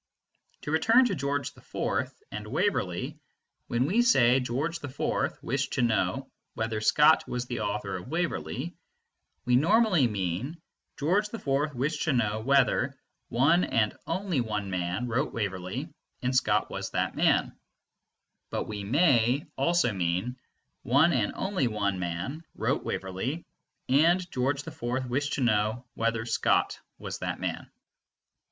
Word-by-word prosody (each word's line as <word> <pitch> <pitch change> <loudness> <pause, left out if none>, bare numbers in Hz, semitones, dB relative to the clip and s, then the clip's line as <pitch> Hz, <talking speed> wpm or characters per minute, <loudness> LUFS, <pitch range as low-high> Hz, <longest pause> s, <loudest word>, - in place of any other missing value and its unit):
To 150 - -3
return 225 +11 +5
to 235 - 0
George 140 -3 -2
IV - - -2 0.2
and 105 0 -6
Waverley, 145 - -1 0.5
when 120 +2 +1
we 200 +11 +3
say 130 - +5
"George 140 +7 -2
IV 140 -2 -2
wished - - -1
to 125 - +1
know 115 -2 0 0.2
whether 110 -1 -2
Scott 150 +7 +5
was 125 0 -3
the 125 - -4
author 105 -2 -2
of 90 - -9
Waverley," 155 - -2 0.7
we 125 - +3
normally 180 - +4
mean 105 - -3 0.4
"George 195 +9 +1
IV 145 - -1
wished 145 +5 -1
to 155 - +2
know 110 -3 +1
whether 135 +3 +2 0.3
one 150 +9 +4
and 105 -2 +1
only 175 -5 0
one 105 -4 -3
man 90 +6 -2
wrote 125 +5 -1
Waverley 100 - -3 0.4
and 125 +1 0
Scott 105 -5 +2
was - - -4
that - - -1
man"; - - +2 0.9
but - - -2
we 105 -2 -5
may 130 - +3
also 170 -9 +2
mean: 90 +6 -1 0.5
"One 145 +7 +4
and 115 -6 +1
only 190 -9 0
one 100 -4 -1
man 90 - -3
wrote - - 0
Waverley, 100 - -3 0.4
and 170 +6 +3
George 135 +3 0
IV 125 +2 -3
wished 145 +4 -1
to - - -1
know 110 +1 +1
whether 115 0 -1
Scott 115 - +1 0.2
was - - -6
that - - -3
man." - - -4
125 Hz, 140 wpm, -28 LUFS, 105-155 Hz, 0.9 s, return